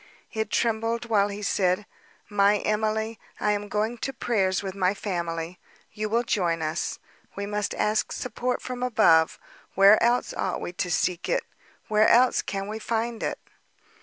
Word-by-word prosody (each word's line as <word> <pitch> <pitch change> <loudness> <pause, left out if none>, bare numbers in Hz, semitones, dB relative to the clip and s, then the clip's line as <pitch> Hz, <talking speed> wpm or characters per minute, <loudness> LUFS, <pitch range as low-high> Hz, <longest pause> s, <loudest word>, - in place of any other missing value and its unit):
It 220 -1 -2
trembled 230 +1 0
while 210 -3 +3
he 205 0 -6
said, 190 0 +1 0.4
"My 205 0 +3
Emily, 220 +1 -1 0.2
I 210 - +2
am 205 0 -2
going 215 +3 -1
to 270 - -2
prayers 200 -7 0
with 190 -1 -4
my 190 0 +1
family; 170 -3 -4 0.3
you 215 0 -3
will 230 +2 +2
join 170 -7 0
us. 155 +2 -2 0.4
We 200 - -3
must 210 0 -2
ask 215 +1 0
support 250 +1 -3
from 250 -1 -5
above. 215 -10 +4 0.4
Where 195 +2 +7
else 240 +1 +2
ought 185 - -2
we 175 - -5
to 180 0 -2
seek 175 +1 0
it—where 215 0 0
else 245 +1 +5
can 195 0 -4
we 215 +1 -5
find 230 +1 -2
it?" - - -2
210 Hz, 160 wpm, -26 LUFS, 190-225 Hz, 0.4 s, Where